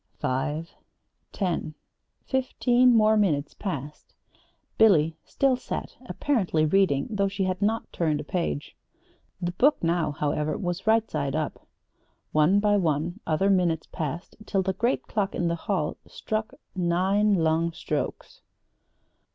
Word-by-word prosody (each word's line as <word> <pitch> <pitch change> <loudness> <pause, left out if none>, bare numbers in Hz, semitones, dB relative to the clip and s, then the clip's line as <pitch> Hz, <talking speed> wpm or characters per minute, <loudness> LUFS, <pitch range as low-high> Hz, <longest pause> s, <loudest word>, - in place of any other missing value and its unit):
Five, 150 +5 -2 0.6
ten, 175 -5 -2 0.5
fifteen 250 -2 +3
more 215 0 +5
minutes 155 -9 +1
passed. 150 -6 -6 0.6
Billy 165 -8 +5
still 270 -2 +2
sat, 250 - -6
apparently 190 - +1
reading, 155 -5 +2
though 200 -2 +1
she 195 0 -2
had 185 +1 -2
not 220 +3 -1
turned 155 -3 0
a - - -4
page. 150 - -3 0.6
The 175 0 -2
book 260 +9 +2
now, 170 -1 +1
however, 150 +1 -1
was 175 +2 -4
right 225 0 +4
side 140 0 -2
up. 155 -1 -4 0.6
One 155 +6 +4
by 205 0 +3
one 170 +1 -1
other 190 +5 +2
minutes 175 -4 +1
passed 160 +3 -5
till 195 -2 +1
the 190 0 -1
great 235 +7 0
clock 200 -3 -2
in 175 -1 0
the - - 0
hall 170 -2 -2
struck 215 0 -4 0.2
nine 190 +4 +2
long 165 0 +1
strokes. - - -4
180 Hz, 135 wpm, -26 LUFS, 155-205 Hz, 0.6 s, more